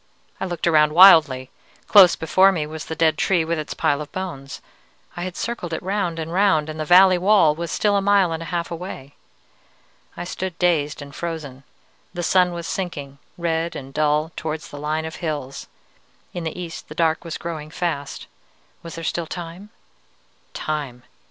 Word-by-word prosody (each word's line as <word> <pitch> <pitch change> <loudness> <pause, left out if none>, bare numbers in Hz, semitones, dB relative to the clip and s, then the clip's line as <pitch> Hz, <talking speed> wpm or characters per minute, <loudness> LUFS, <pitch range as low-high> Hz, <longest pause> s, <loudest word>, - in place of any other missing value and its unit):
I - - -2
looked 175 -2 -4
around 150 -2 +4
wildly. 155 -8 +7 0.4
Close 190 -4 +7
before 185 +4 +4
me 160 -5 -2
was 155 0 -7
the 160 - -5
dead 160 -2 +2
tree 175 -4 +2
with 165 0 -1
its 155 - -5
pile 145 +1 +1
of 150 -1 -8
bones. 140 -8 -6 0.6
I 175 - -6
had 180 0 -5
circled 230 -8 -4
it 160 - -4
round 185 -3 -2
and 165 +1 -5
round, 185 -6 +2
and 155 0 -7
the 155 - -2
valley 185 +2 +6
wall 185 -5 +4
was 170 +2 -5
still 205 -1 +1
a 200 - +2
mile 195 -3 +3
and 165 0 -3
a 165 - -6
half 170 -1 -3
away. 160 -5 -7 1.0
"I - - -4
stood 185 0 -5
dazed 155 -5 0
and 140 -1 -12
frozen. 155 -6 -6 0.5
The 175 - -3
sun 180 +1 +3
was 170 -1 -6
sinking, 145 -8 -5 0.2
red 170 -1 -1
and 135 0 -8
dull, 155 +1 +1
towards 155 0 -5
the 145 - -9
line 155 +2 -2
of 160 - -7
hills. 145 -5 -5 0.7
In 175 -2 -5
the 160 +2 -5
east 170 -1 -8
the - - -9
dark 160 -1 +1
was 165 -2 -5
growing 160 -3 -6
fast. 160 -4 -4 0.6
Was 165 - -9
there 165 - -7
still 165 0 -2
time? 175 +4 -8 0.9
_Time! 140 -5 -4
165 Hz, 185 wpm, -22 LUFS, 150-180 Hz, 1.0 s, wildly